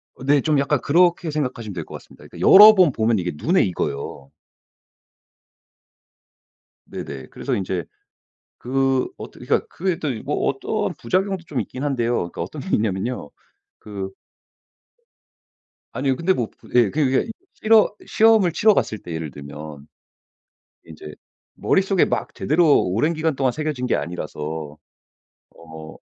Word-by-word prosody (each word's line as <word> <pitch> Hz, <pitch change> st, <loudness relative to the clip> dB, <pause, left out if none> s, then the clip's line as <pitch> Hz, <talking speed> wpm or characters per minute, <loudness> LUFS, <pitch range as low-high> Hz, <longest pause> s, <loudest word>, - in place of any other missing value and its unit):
어 130 Hz, -, -12 dB
네 140 Hz, 0 st, +3 dB
좀 150 Hz, -3 st, +1 dB
약간 140 Hz, 0 st, +1 dB
그렇게 170 Hz, +1 st, +2 dB
생각하시면 125 Hz, -8 st, -3 dB
될 85 Hz, -3 st, -6 dB
것 -, -, -10 dB
같습니다. -, -, -14 dB
그러니까 -, -, -13 dB
여러 210 Hz, +2 st, +10 dB
번 180 Hz, -7 st, +5 dB
보면 110 Hz, -3 st, +1 dB
이게 90 Hz, 0 st, -2 dB
눈에 175 Hz, -, +2 dB
익어요. 70 Hz, -6 st, -4 dB, 2.6 s
네네. 70 Hz, -1 st, -7 dB
그래서 -, -, -3 dB
인제 95 Hz, -4 st, -3 dB, 0.7 s
그 135 Hz, +1 st, 0 dB
어떻게 -, -, -10 dB
그러니까 -, -, 0 dB
그게 180 Hz, -1 st, -2 dB
또 150 Hz, -, -2 dB, 0.2 s
뭐 -, -, -1 dB
어떠한 -, -, -2 dB
부작용도 185 Hz, +7 st, -1 dB
좀 140 Hz, -, -3 dB
있긴 130 Hz, +2 st, -7 dB
한데요. 120 Hz, -4 st, 0 dB
그러니까 85 Hz, -, -4 dB
어떤 -, -, -6 dB
게 -, -, -8 dB
있냐면요 105 Hz, -, -2 dB, 0.5 s
그 100 Hz, -2 st, -7 dB, 1.8 s
아니요 135 Hz, 0 st, 0 dB
근데 180 Hz, +6 st, +1 dB
뭐 120 Hz, -8 st, -2 dB
부 -, -, -20 dB
예 120 Hz, -5 st, +5 dB
그냥 145 Hz, -3 st, +1 dB
그게 135 Hz, -, +1 dB
이 -, -, -5 dB, 0.2 s
실허 215 Hz, -1 st, +4 dB
시험을 220 Hz, -5 st, +4 dB
치러 215 Hz, +5 st, +4 dB
갔을 110 Hz, -, -1 dB
때 85 Hz, -, -10 dB
예를 80 Hz, -3 st, -5 dB
들면 70 Hz, +1 st, -10 dB, 1.0 s
인제 75 Hz, -1 st, -11 dB, 0.4 s
머릿속에 190 Hz, -1 st, +2 dB
막 -, -, -3 dB
제대로 155 Hz, -1 st, +3 dB
오랜 110 Hz, -, 0 dB
기간 160 Hz, -1 st, -1 dB
동안 130 Hz, -2 st, +1 dB
새겨진 150 Hz, -4 st, -3 dB
게 -, -, +1 dB
아니라서 80 Hz, -2 st, -6 dB, 0.8 s
어 80 Hz, -1 st, -11 dB
130 Hz, 300 characters per minute, -22 LUFS, -, 2.6 s, 여러